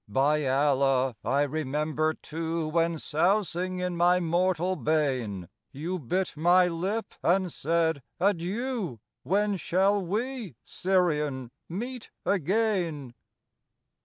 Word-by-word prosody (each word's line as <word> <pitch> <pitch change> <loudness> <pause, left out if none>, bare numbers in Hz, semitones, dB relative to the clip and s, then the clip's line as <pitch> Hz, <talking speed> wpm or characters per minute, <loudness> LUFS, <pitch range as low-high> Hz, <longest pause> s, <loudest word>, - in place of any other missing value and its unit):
By 140 +6 +2
Allah, 135 -2 +2
I 140 +2 +2
remember, 155 +2 -1
too, 165 0 -3
When, 165 +1 +1
sousing 180 +3 0
in 180 -1 -2
my 175 +1 +4
mortal 180 +1 +1
bain, 130 - -1 0.2
You 170 +7 -4
bit 180 +7 -1
my 175 +4 +5
lip 190 +6 -2
and 180 -1 +2
said, 160 -1 +1 0.2
"Adieu, 200 - -1 0.2
When 205 +1 +1
shall 195 +3 +2
we, 220 - -3
Syrian, 150 -9 0 0.2
meet 240 +7 -5 0.2
again?" 180 - 0
170 Hz, 105 wpm, -28 LUFS, 150-185 Hz, 0.2 s, my